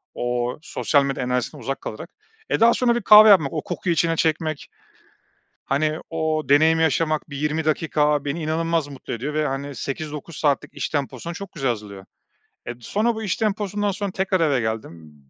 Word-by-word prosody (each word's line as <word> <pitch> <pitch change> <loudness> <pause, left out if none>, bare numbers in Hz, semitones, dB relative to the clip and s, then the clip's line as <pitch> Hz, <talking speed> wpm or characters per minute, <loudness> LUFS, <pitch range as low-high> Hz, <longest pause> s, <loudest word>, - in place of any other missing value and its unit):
o 120 0 -2
sosyal 145 -2 +1
medya 135 -2 -2
enerjisinden 125 +3 -2
uzak 135 +4 -3
kalarak. 160 +10 -7 0.4
Eee, - - +1
daha 230 +1 +6
sonra 240 -2 +2
bir 240 - -1
kahve 215 +1 +9
yapmak, 160 -9 +5
o 155 - -2
kokuyu 175 -2 -2
içine 165 0 +1
çekmek, 155 -1 -1 1.0
hani, 155 +3 0
o 160 -1 -1
deneyimi 160 +3 +4
yaşamak, 155 -1 0
bir 140 - -6
20 150 +2 -1
dakika 150 -2 +1
beni 155 +3 -3
inanılmaz 165 0 0
mutlu 140 -2 -8
ediyor 135 +6 -4
ve, 155 0 +1
hani, 140 +1 -4
8-9 150 +3 -6
saatlik 145 -3 0
iş - - -3
temposuna 145 +2 -4
çok 200 +3 -8
güzel 135 -4 -2
hazırlıyor. 105 -4 -6 0.6
Eee, 120 - -4
sonra 220 - 0
bu 220 - -5
iş 195 - -1
temposundan 205 -1 -1
sonra 200 0 -4
tekrar 190 0 0
eve 145 -5 +2
geldim, 85 -9 -5
155 Hz, 175 wpm, -22 LUFS, 135-170 Hz, 1.0 s, kahve